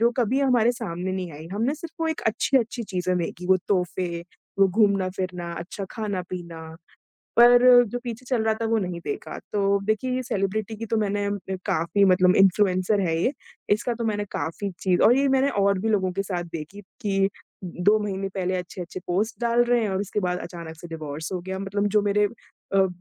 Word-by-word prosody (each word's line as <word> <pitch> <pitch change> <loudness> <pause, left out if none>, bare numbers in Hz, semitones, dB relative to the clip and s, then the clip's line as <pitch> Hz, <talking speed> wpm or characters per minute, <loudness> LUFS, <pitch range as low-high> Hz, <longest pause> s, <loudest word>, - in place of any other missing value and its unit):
जो 235 +1 +4
कभी 250 +2 +1
हमारे 245 -3 +3
सामने 185 -5 -4
नहीं 185 -2 -3
आईं। 155 +3 -10
हमने 230 +8 0
सिर्फ़ 325 +1 -8
वो 325 - +1
एक 320 - -2
अच्छी-अच्छी 235 +1 +1
चीज़ें 185 -3 -1
देखी, 175 +1 -4
वो 190 0 +5
तोहफ़े 180 -2 -1 0.4
वो 195 -1 +6
घूमना-फिरना, 185 -3 0
अच्छा 185 +3 -6
खाना-पीना, 180 -5 -5 0.8
पर 240 +1 +8 0.3
जो 245 +4 -3
पीछे 240 +1 -6
चल 245 -4 +1
रहा 220 0 +2
था, 225 - -4
वो 225 0 +2
नहीं 180 -3 -3
देखा। - - -5
तो 200 -1 +2
देखिए, 215 +4 0
ये 255 - -1
सेलिब्रिटी 215 -2 -2
की 225 +1 -6
तो 225 - 0
मैंने 205 -1 0 0.3
ए 190 - -1
काफ़ी 170 +5 +2
मतलब 185 0 +4
इन्फ्लुएंसर 195 +1 +3
है 165 - +1
ये। 260 - +2 0.4
इसका 235 +3 -2
तो 230 0 -4
मैंने 205 -2 -1
काफ़ी 195 +5 -3
चीज़ 185 -2 +2
और 240 +4 +6
ये 280 - +3
मैंने 270 +1 +3
और 200 -1 +3
भी 225 - -1
लोगों 190 -4 +1
के 195 +2 -1
साथ 180 -3 -3
देखी 165 +6 -6 0.2
कि 195 -2 0 0.4
उ - - -4
उ - - -6
2 215 +1 +6
महीने 195 -1 -3
पहले 185 -1 -1
अच्छे-अच्छे 180 0 -6
पोस्ट 205 +8 -1
डाल 235 +1 +3
रहे 240 -1 +2
हैं 215 - 0
और 190 0 -1
उसके 205 +1 -2
बाद 180 -1 -1
अचानक 165 -2 -8
से 175 - -9
डिवोर्स 155 +1 -6
हो 180 - -2
गया। 190 +2 -5
मतलब 200 +1 -1
जो 210 - +5
मेरे 205 0 +2 0.5
अ, 195 -1 +5
200 Hz, 205 wpm, -25 LUFS, 180-225 Hz, 0.8 s, पर